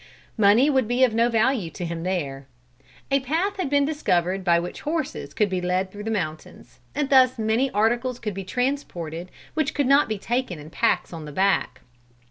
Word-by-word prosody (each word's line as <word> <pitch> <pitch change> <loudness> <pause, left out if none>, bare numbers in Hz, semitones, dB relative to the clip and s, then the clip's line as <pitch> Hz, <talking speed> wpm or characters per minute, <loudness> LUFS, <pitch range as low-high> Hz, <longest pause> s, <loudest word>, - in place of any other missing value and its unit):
Money 220 +5 +5
would 265 -6 +2
be 245 +2 +2
of 250 -4 +4
no 230 +1 +3
value 225 -4 +1
to 175 - -6
him 170 0 -4
there. 145 -7 -3 0.6
A 275 - +4
path 335 +10 -1
had 365 -7 -2
been 285 0 +3
discovered 190 - 0
by 170 -2 +4
which 175 +1 -6
horses 310 -1 -3
could 210 - +1
be 185 -2 -2
led 185 +1 -1
through 210 +1 -8
the - - -2
mountains, 155 -8 -5 0.2
and 290 -2 -1
thus 260 -1 +5
many 225 +4 +1
articles 240 +3 +1
could 210 -4 -4
be 195 +1 -5
transported 185 - -3 0.2
which 315 0 -1
could 285 - +1
not 275 -1 +4
be 215 - -1
taken 240 -3 -2
in 150 +2 -11
packs 180 +2 0
on 160 -2 -7
the 150 - -8
back. 195 +6 +1
220 Hz, 195 wpm, -24 LUFS, 180-265 Hz, 0.6 s, Money